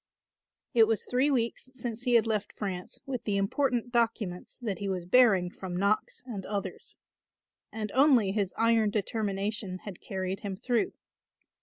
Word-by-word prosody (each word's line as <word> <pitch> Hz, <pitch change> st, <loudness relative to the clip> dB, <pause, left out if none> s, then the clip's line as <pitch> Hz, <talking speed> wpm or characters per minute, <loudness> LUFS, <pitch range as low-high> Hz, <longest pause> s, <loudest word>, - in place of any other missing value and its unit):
It 225 Hz, -3 st, +6 dB
was 220 Hz, -3 st, 0 dB
three 255 Hz, +4 st, +2 dB
weeks 245 Hz, -1 st, -1 dB
since 240 Hz, -2 st, -4 dB
he 245 Hz, -1 st, +3 dB
had 230 Hz, -, +5 dB
left 215 Hz, -2 st, -1 dB
France 185 Hz, -3 st, -5 dB
with 255 Hz, -4 st, -4 dB
the 205 Hz, -2 st, 0 dB
important 245 Hz, +4 st, 0 dB
documents 225 Hz, -6 st, -1 dB
that 205 Hz, -5 st, -2 dB
he 200 Hz, -1 st, -2 dB
was 180 Hz, -2 st, -2 dB
bearing 190 Hz, -4 st, +5 dB
from 180 Hz, -2 st, -6 dB
Knox 200 Hz, +3 st, 0 dB
and 215 Hz, -7 st, -5 dB
others; 200 Hz, 0 st, -5 dB, 0.7 s
and 215 Hz, -2 st, -4 dB
only 260 Hz, -7 st, +5 dB
his 200 Hz, -2 st, 0 dB
iron 225 Hz, -1 st, +4 dB
determination 205 Hz, -2 st, -2 dB
had 200 Hz, -4 st, -8 dB
carried 190 Hz, -1 st, -3 dB
him 200 Hz, -2 st, -4 dB
through. 235 Hz, +3 st, 0 dB
215 Hz, 155 wpm, -29 LUFS, 195-235 Hz, 0.7 s, It